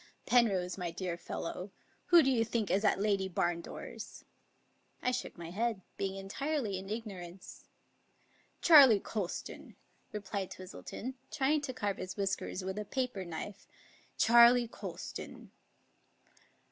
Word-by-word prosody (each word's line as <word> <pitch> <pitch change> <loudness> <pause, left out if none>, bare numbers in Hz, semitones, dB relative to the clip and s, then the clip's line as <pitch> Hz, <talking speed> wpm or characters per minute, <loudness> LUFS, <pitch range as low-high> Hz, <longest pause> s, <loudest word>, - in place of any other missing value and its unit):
" - - -40
Penrose, 195 -7 +2
my 175 -1 -2
dear 175 +1 -3
fellow, 180 +2 -5 0.4
who 345 -2 +8
do 270 - +3
you 235 -3 +3
think 225 -2 -1
is 200 +2 +2
at 210 - +3
Lady 200 -2 +1
Barndore's?" 175 +6 -4 0.7
I 250 - 0
shook 250 - -4
my 170 -1 -7
head, 220 +1 -1
being 195 -1 -2
entirely 210 +2 -2
in 195 +1 -9
ignorance. 195 -5 -7 0.5
" - - -37
Charley 275 - +9
Colston," 195 -3 -5 0.4
replied 200 -2 -4
Twistleton, 185 +6 -7 0.2
trying 295 +1 +1
to 285 -3 -3
carve 205 -4 -1
his 185 - -6
whiskers 195 -1 -2
with 190 +2 -3
a 210 - -4
paper 250 -4 -2
knife. 180 +4 -7 0.3
" - - -30
Charley 235 +1 +7
Colston." - - -8
205 Hz, 135 wpm, -33 LUFS, 185-235 Hz, 0.7 s, Charley